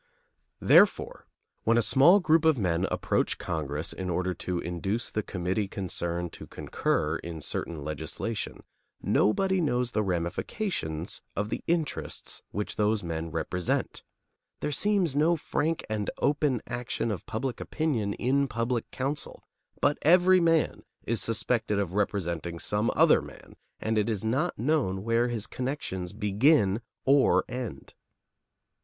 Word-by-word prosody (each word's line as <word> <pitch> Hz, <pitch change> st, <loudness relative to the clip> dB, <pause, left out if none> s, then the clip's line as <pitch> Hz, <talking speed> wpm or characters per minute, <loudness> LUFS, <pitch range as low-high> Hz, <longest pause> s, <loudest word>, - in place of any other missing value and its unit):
Therefore, -, -, +4 dB, 0.4 s
when 115 Hz, +1 st, +3 dB
a 120 Hz, -, +4 dB
small 140 Hz, -, +6 dB
group 165 Hz, -2 st, +3 dB
of 160 Hz, -3 st, +4 dB
men 90 Hz, -3 st, +1 dB
approach -, -, 0 dB
Congress 75 Hz, 0 st, -3 dB
in 95 Hz, -1 st, -4 dB
order 90 Hz, +1 st, 0 dB
to 90 Hz, 0 st, -3 dB
induce 90 Hz, +7 st, -2 dB
the 105 Hz, -, -1 dB
committee 95 Hz, +1 st, -2 dB
concerned 85 Hz, -3 st, -3 dB
to -, -, -10 dB
concur 80 Hz, +2 st, -1 dB
in 85 Hz, -2 st, -7 dB
certain 75 Hz, +1 st, -3 dB
legislation, 75 Hz, +9 st, -4 dB, 0.4 s
nobody 190 Hz, -, +2 dB
knows 125 Hz, -5 st, 0 dB
the 110 Hz, -, +1 dB
ramifications 85 Hz, -, -2 dB
of 105 Hz, +1 st, -1 dB
the -, -, -4 dB
interests 165 Hz, -3 st, -2 dB
which 105 Hz, 0 st, -4 dB
those 105 Hz, -1 st, +1 dB
men 80 Hz, -1 st, -3 dB
represent; 90 Hz, +3 st, -2 dB, 0.6 s
there 150 Hz, -, -2 dB
seems 185 Hz, -2 st, +2 dB
no 160 Hz, +4 st, +4 dB
frank 160 Hz, +1 st, -1 dB
and 105 Hz, -2 st, -2 dB
open 145 Hz, -4 st, +1 dB
action 120 Hz, -1 st, -2 dB
of 95 Hz, -5 st, -5 dB
public 125 Hz, +3 st, -3 dB
opinion 125 Hz, -11 st, -1 dB
in 140 Hz, +3 st, +1 dB
public 115 Hz, 0 st, -2 dB
counsel, 140 Hz, +3 st, -4 dB, 0.4 s
but 145 Hz, 0 st, +2 dB
every 180 Hz, +3 st, +6 dB
man 165 Hz, -2 st, +2 dB, 0.2 s
is 115 Hz, -1 st, -1 dB
suspected 115 Hz, -1 st, 0 dB
of 100 Hz, -3 st, -1 dB
representing 85 Hz, -5 st, -1 dB
some 105 Hz, +6 st, 0 dB
other -, -, +5 dB
man -, -, -13 dB, 0.2 s
and 110 Hz, 0 st, 0 dB
it 105 Hz, -, 0 dB
is 110 Hz, -1 st, -2 dB
not 135 Hz, +10 st, 0 dB
known 115 Hz, -8 st, 0 dB
where 115 Hz, +2 st, +2 dB
his 115 Hz, -3 st, -2 dB
connections 125 Hz, -9 st, -4 dB
begin 105 Hz, +1 st, +3 dB, 0.2 s
or 140 Hz, +1 st, +4 dB
end. 125 Hz, -4 st, -6 dB
110 Hz, 135 wpm, -28 LUFS, 95-140 Hz, 0.6 s, small